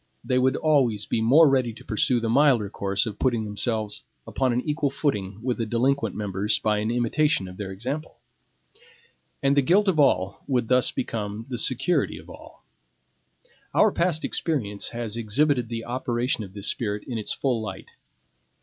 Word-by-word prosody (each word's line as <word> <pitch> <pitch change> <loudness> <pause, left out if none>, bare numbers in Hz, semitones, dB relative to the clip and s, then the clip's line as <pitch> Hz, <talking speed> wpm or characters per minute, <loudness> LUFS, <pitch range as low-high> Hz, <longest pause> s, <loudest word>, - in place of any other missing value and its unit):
They 125 - +1
would 130 +1 +2
always 130 -9 +2
be 110 - -1
more 145 +8 +6
ready 130 -4 +2
to - - -15
pursue 120 +3 +1
the 115 - -2
milder 120 -4 +3
course 100 0 0
of 105 -3 -6
putting 120 -4 +1
themselves 105 0 -2 0.2
upon 130 -2 0
an 120 +1 0
equal 150 0 -1
footing 105 -9 -2
with 125 -1 -1
the 115 - 0
delinquent 130 +5 0
members 105 +1 0
by 105 -1 0
an 105 +1 -1
imitation 120 - +1
of 90 0 -10
their 100 -2 -5
example. 130 +11 -5 1.3
And 140 0 +3
the 140 - +5
guilt 190 +9 +3
of 175 -5 +2
all 100 -9 +2
would 125 -5 0
thus 125 -1 +4
become 110 -2 -4
the 120 -3 -3
security 130 +9 +1
of - - -12
all. - - -14 1.1
Our 215 - +5
past 170 -3 0
experience 105 -11 -2
has 115 -2 -5
exhibited 125 +2 +1
the 115 -1 -4
operation 120 -1 -1
of 95 -2 -11
this 100 0 -6
spirit 105 -3 -1
in 120 -3 -3
its 105 - -2
full 125 -5 -1
light. 110 - -7
120 Hz, 175 wpm, -25 LUFS, 105-135 Hz, 1.3 s, more